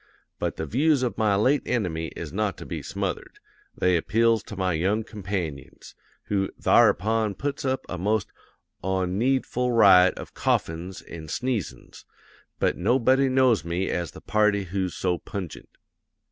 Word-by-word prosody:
But - - -2
the 80 - -4
views 140 - +2
of 120 -5 -1
my 105 -2 +3
late 130 +8 +3
enemy 85 -9 -1
is 80 -2 -7
not 105 -2 -1
to - - -9
be - - -5
smothered; - - -4 0.4
they 90 -1 +3
appeals 115 +5 +2
to - - -8
my 95 -2 0
young 95 +7 0
companions; 90 -10 -6 0.3
who 95 -1 -1
tharupon 110 0 +3
puts 145 +2 -3
up 130 0 -1
a 90 - -5
most 105 +2 0 0.5
onneedful 110 +7 0
riot 95 -5 +6
of - - -9
coughin's 85 +3 -2
an' 80 -2 -9
sneezin's. 115 - -4 0.5
But - - 0
nobody 130 +7 +3
knows 130 -4 +3
me 85 +3 -2
as 85 -2 -2
the - - -12
party 105 -2 +2
who's 95 -1 -3
so 90 -2 -1
pungent. 95 -5 -7
100 Hz, 145 wpm, -25 LUFS, 90-115 Hz, 0.5 s, riot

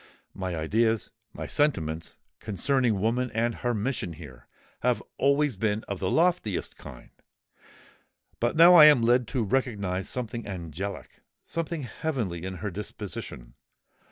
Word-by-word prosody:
My 95 -2 -4
ideas—my 110 +7 -1
sentiments, 80 - -1 0.2
concerning 115 +1 0
woman 120 +5 0
and 115 +1 +1
her 120 +1 -2
mission 110 -5 -2
here, 70 -6 -12 0.3
have - - 0 0.2
always 140 -1 +2
been 105 +1 0
of 100 -2 -4
the 95 - -1
loftiest 165 - +1
kind: - - -12 1.3
but 120 +1 0
now 170 +3 +8
I 160 -4 +10
am 145 -6 +7
led 120 0 +3
to 125 -2 -1
recognise 100 -5 -1
something 120 -2 -4
angelic—something 100 - -6
heavenly 120 - -3
in 95 0 -4
her 105 - -2
disposition. 95 - -7
110 Hz, 125 wpm, -27 LUFS, 95-130 Hz, 1.3 s, I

